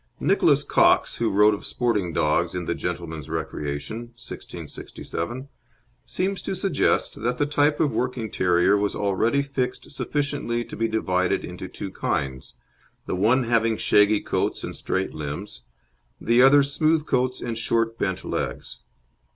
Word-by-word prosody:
Nicholas - - +3
Cox, - - +3
who 115 - +1
wrote 105 +2 +5
of 100 - -5
sporting 105 -8 0
dogs 80 +3 +1
in 90 -1 -3
The - - 0
Gentleman's 85 -4 -5
Recreation 70 +7 -4 0.2
(1667), 130 +2 -7 0.6
seems 190 +1 -2
to - - -3
suggest 185 - 0
that 120 +2 0
the 145 - +2
type 145 0 +2
of 150 - +2
working 125 -4 -2
terrier 90 +2 +3
was 105 0 0
already 110 +7 +1
fixed 130 -3 -3
sufficiently 140 -5 -2
to - - -9
be 115 - 0
divided 95 -5 0
into - - -7
two - - -7
kinds, 65 -2 -3 0.5
the - - -3
one 115 +8 +3
having 115 -1 +2
shaggy 105 0 +4
coats - - -1
and - - -5
straight 95 0 -2
limbs, 75 +1 -6 0.6
the 120 +2 +3
other 140 +2 +7
smooth 155 +2 +1
coats 130 -2 0
and 115 -2 -4
short 115 0 0
bent 95 -1 -2
legs. - - -4
115 Hz, 145 wpm, -24 LUFS, 95-130 Hz, 0.6 s, other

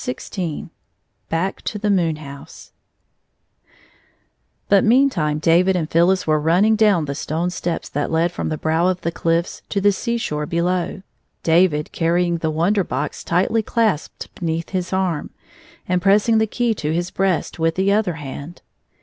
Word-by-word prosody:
iSS 250 -1 -6
XVI 175 -6 -4 0.6
Back 170 +4 -2
to 210 - -4
the 210 0 0
Moon 170 -5 +2
House 140 -2 -11 2.0
BUT 200 -1 +4
meantime 220 - +3
David 175 +4 +3
and 165 -3 -2
Phyllis 175 +3 +3
were 155 -1 +2
run 160 +3 +2
I - - +3
ning 220 +1 +4
down 205 -7 +3
the 140 - -3
stone 160 +5 -2
steps 175 -1 -3
that 145 +1 -2
led 165 +1 +1
from - - -3
the 155 - -2
hrow 160 +3 +1
of 185 -1 -2
the 170 - -2
cliffs 165 +1 -1
to 200 - 0
the 205 +1 +4
seashore 195 -9 -2
be 170 - -1
low, 180 +2 -1 0.4
David 160 -2 +2
carrying 170 +1 +1
the 160 - -1
Wonder 175 +6 +1
Box 150 -3 -4
tightly 185 +6 +1
clasped 220 -7 -1
beneath 165 -2 -3
his 185 -1 -3
arm, 185 -5 -1 0.6
and 180 0 +1
pressing 210 +4 +4
the 220 - +2
key 235 +2 0
to 155 -7 -3
his 175 +3 -2
breast 190 -3 -1
with 165 0 +1
the 190 +1 +2
other 205 -3 +1
hand. 150 +2 -8
175 Hz, 170 wpm, -20 LUFS, 160-195 Hz, 2.0 s, BUT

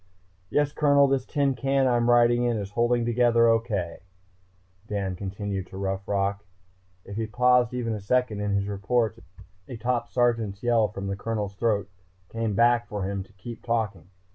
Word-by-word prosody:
"Yes, 145 +4 +1
Colonel, 145 -2 +4
this 135 -2 0
tin 140 -2 +1
can 135 +2 +1
I'm 120 -1 +2
riding 120 0 +4
is 105 -5 -1
holding 120 +1 +1
together 120 0 +3
okay," 110 -7 0 0.9
Dan 100 -3 -2
continued 95 0 -4
to 95 - -10
Rough 95 0 -3
Rock. 100 0 -1 0.6
If 100 +1 -8
he 110 -1 -2
paused 125 +1 +3
even 115 -2 -2
a 105 - -4
second 125 0 0
in 105 -1 -1
his 100 0 0
reports 110 +3 0 0.5
a 125 - -7
top 120 +1 -1
sergeant's 115 -4 0
yell 115 -3 +3
from 100 -1 -7
the 100 0 -2
Colonel's 105 -1 -3
throat 100 -2 0 0.4
came 115 -2 -2
back 120 +2 +3
for 105 -2 -4
him 100 0 -2
to 95 +2 -13
keep 115 +4 -9
talking. 110 -7 -2
115 Hz, 165 wpm, -26 LUFS, 100-120 Hz, 0.9 s, Colonel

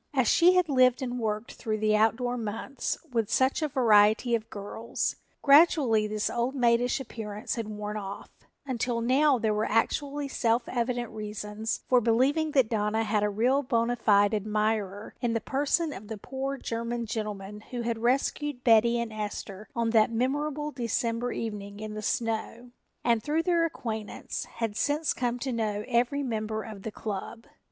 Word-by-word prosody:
As 260 -4 +3
she 345 +8 +6
had 365 -2 +3
lived 255 -2 +4
and 250 -1 -3
worked 215 0 -2
through 215 -3 -3
the 215 0 +2
outdoor 225 +3 +2
months 230 +4 -3
with 225 -3 0
such 260 +7 +2
a 310 - +1
variety 225 -2 +4
of 225 -1 -1
girls, 210 +3 -3 0.3
gradually 280 -7 +5
this 210 0 -1
old 240 +3 -1
maidish 245 0 +2
appearance 215 -4 -5
had 230 -4 -3
worn 210 0 -5
off, 200 -1 -7 0.3
until 245 -2 -1
now 265 +4 +3
there 220 -2 0
were 210 +1 0
actually 285 +6 0
self 235 -3 +1
evident 240 -1 -2
reasons 210 0 -4
for 250 -1 +4
believing 265 +8 +2
that 265 -5 +4
Donna 220 0 0
had 210 -1 +1
a 210 - +2
real 245 +7 +2
bona 240 -2 +1
fide 205 -2 +3
admirer 210 -1 -1
in 240 -2 0
the 230 - +1
person 290 +6 0
of 210 - -9
the 220 0 -5
poor 270 +5 -4
German 235 -1 -3
gentleman 210 -2 -5
who 245 -1 -4
had 230 -1 -2
rescued 260 +2 0
Betty 235 0 +5
and 235 -2 -3
Esther 210 -1 -6
on 230 -1 0
that 220 -2 +4
memorable 290 +5 -1
December 235 -1 -1
evening 205 -2 -5
in 215 0 -6
the 215 - -5
snow 230 +2 -2 0.3
and, 235 -2 +2
through 305 +7 0
their 340 -2 +2
acquaintance, 220 -9 -5
had 225 -3 -4
since 295 +6 +1
come 245 -1 -1
to 260 +1 -3
know 210 -2 -1
every 250 +4 +1
member 220 -3 -2
of 215 -3 -9
the 220 - -5
club. 215 +2 -6
230 Hz, 170 wpm, -28 LUFS, 215-255 Hz, 0.3 s, she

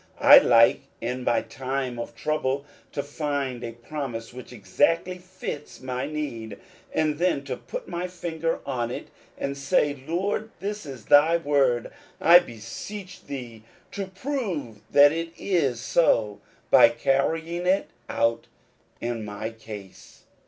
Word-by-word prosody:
I - - +10
like 115 -1 +5 0.2
in 125 +2 -3
my 120 - +2
time 130 -2 -3
of 120 - -6
trouble 140 -2 -1 0.3
to 140 - -3
find 145 -4 -3
a 115 - -5
promise 120 -2 -6
which 125 0 -10
exactly 165 - 0
fits 180 -5 -7
my 130 +1 -3
need, 120 -9 -5 0.3
and 155 -1 0
then 175 -6 +1
to 130 -2 -4
put 120 0 -7
my 175 0 -3
finger 165 -2 -3
on 120 -4 -2
it, - - -6 0.3
and 140 0 -3
say, 140 0 +1
" - - -20
Lord, 200 +6 -1
this 205 -3 -4
is 130 -6 -9
thy 155 +4 +6
word; 140 -6 +1 0.3
I 175 +1 +8
beseech 180 - -8
thee 125 -5 -7 0.3
to 195 -1 -4
prove 190 - -4
that 145 0 +7
it 165 +1 -4
is 145 -11 0
so, 110 -8 +2 0.3
by 115 - +8
carrying 160 +8 0
it 190 +2 +2 0.2
out 115 0 0 0.5
in 120 -2 -3
my 105 +2 -5
case. 105 -4 -11
140 Hz, 140 wpm, -25 LUFS, 120-165 Hz, 0.5 s, I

